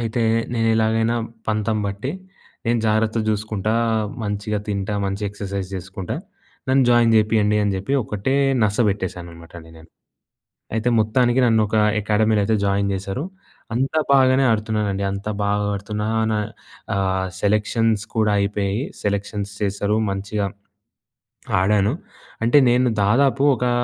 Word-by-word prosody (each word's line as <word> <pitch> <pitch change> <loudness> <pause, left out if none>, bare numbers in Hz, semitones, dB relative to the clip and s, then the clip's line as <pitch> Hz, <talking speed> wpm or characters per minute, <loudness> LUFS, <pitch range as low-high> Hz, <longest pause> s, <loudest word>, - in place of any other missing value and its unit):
అయితే, 115 0 -1 0.3
నేనెలాగైనా 115 0 +2 0.3
పంతం 110 0 0
బట్టి, 100 +7 -4 0.6
నేను 120 0 +2
జాగ్రత్తగా 110 +1 +1
చూసుకుంటా 105 0 -2 0.5
మంచిగా 105 0 -2
తింటా 100 0 -2
మంచి 100 +2 -3
ఎక్సర్సైజ్ 100 -2 -5
చేసుకుంటా. 95 0 -5 0.5
నన్ను 135 0 +4
జాయిన్ 120 -1 +4
చేపియండి 105 -1 +3
అని 100 - +1
చెప్పి, 100 +8 -4
ఒకటే 105 +7 -2 0.3
నసబెట్టేసాను 100 -5 -1
అనమాట 85 0 -14
అండి 80 0 -14
నేను. 80 0 -16 0.9
అయితే, 110 +2 0
మొత్తానికి 120 +3 +2
నన్ను 110 -1 +3
ఒక 110 - -1 0.3
అకాడమీలో 110 0 +2
అయితే 110 +1 +1
జాయిన్ 100 0 +1
చేసారు. 95 - -4 0.5
అంతా 135 +5 +1
బాగానే 130 0 +5
ఆడుతున్నానండి. 105 -3 -1
అంత 100 +1 -6 0.2
బాగా 105 0 0
ఆడుతున్నా 105 +2 -4 0.2
నా 105 - +1 0.6
ఆహ్, 95 -1 0
సెలెక్షన్స్ 105 +1 +1
కూడా 105 -1 +2
అయిపోయాయి. 100 +3 -1 0.2
సెలెక్షన్స్ 100 0 -2
చేసేసారు. 100 +1 0
మంచిగా, 100 +1 -2 1.1
ఆడాను 100 +2 +2 0.5
అంటే 120 +6 +4
నేను 125 +1 +3 0.2
దాదాపు 135 +5 +3
ఒకా 125 +1 -1
105 Hz, 125 wpm, -21 LUFS, 100-115 Hz, 1.1 s, బాగానే